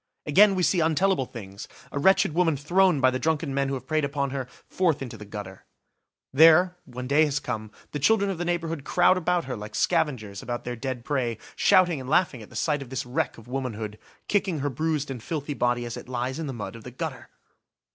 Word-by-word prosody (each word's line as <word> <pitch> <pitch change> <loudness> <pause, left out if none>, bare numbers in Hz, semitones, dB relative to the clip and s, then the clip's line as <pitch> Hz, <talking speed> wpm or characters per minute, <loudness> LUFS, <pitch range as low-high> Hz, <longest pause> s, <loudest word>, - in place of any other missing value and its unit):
Again, 195 +6 +6
we 185 - 0
see 180 - +3
untellable 165 -2 +2
things–a 100 +5 -9
wretched 190 -1 +4
woman 165 -3 +2
thrown, 175 +2 +3
by 130 -1 +5
the 130 - -2
drunken 155 -2 0
men 140 0 +1
who 135 - -1
have 130 -1 -7
preyed 155 +1 0
upon 140 -1 -1
her, 135 -2 -3 0.2
forth 175 -5 +1
into 125 -4 -6
the 105 -1 -10
gutter. 100 -2 -8 0.7
There, 165 +5 +6
when 125 -1 -7
day 145 +4 +4
has 145 -1 -1
come, 110 -6 -4 0.2
the 145 - -3
children 200 +5 +3
of 180 - -5
the - - -1
neighbourhood 165 -4 -2
crowd 180 +4 +4
about 180 -1 0
her 130 - -4
like 105 0 -8
scavengers 130 - 0
about 120 0 -4
their 125 0 -4
dead 125 0 -5
prey, 125 -6 -1 0.2
shouting 180 -7 +4
and 130 - -8
laughing 150 -6 +2
at 105 - -12
the - - -15
sight 145 +7 0
of 135 - -8
this 130 -1 -3
wreck 125 +1 -2
of 115 - -14
womanhood, 115 -5 -4 0.3
kicking 190 -7 0
her 145 0 -1
bruised 150 +1 -1
and 125 -3 -6
filthy 145 +2 -4
body 120 -2 0
as 120 - -5
it - - -9
lies 130 +3 -3
in 160 - -3
the - - -3
mud 115 -1 -6
of 115 - -11
the 125 - -8
gutter! 125 - -6
140 Hz, 220 wpm, -26 LUFS, 120-165 Hz, 0.7 s, Again